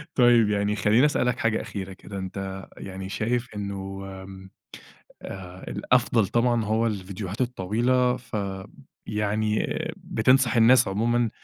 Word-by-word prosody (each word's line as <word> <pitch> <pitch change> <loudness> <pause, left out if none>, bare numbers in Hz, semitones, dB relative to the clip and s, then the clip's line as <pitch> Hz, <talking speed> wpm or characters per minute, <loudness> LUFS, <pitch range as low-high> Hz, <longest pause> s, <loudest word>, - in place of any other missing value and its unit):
طيب 120 -4 +5
يعني 105 0 +1
خلّيني 110 +6 +4
أسألك 125 -4 +1
حاجة 115 -1 +1
أخيرة 95 -2 -6
كده، 100 +2 -9
أنت 95 0 -5
يعني 95 0 -7
شايف 120 +4 -1
إنه 95 -1 -5 0.2
آمم 95 0 -11 0.7
آآ 95 -1 -8
الأفضل 115 -1 +2
طبعًا 120 0 +2
هو 110 +2 +1
الفيديوهات 100 +1 -4
الطويلة 125 +3 +1
ف 120 -3 -6 0.7
يعني 105 +1 0 0.3
بتنصح 130 +1 +2
الناس 120 +1 +6
عمومًا 115 +3 +1
110 Hz, 120 wpm, -25 LUFS, 95-120 Hz, 0.7 s, الناس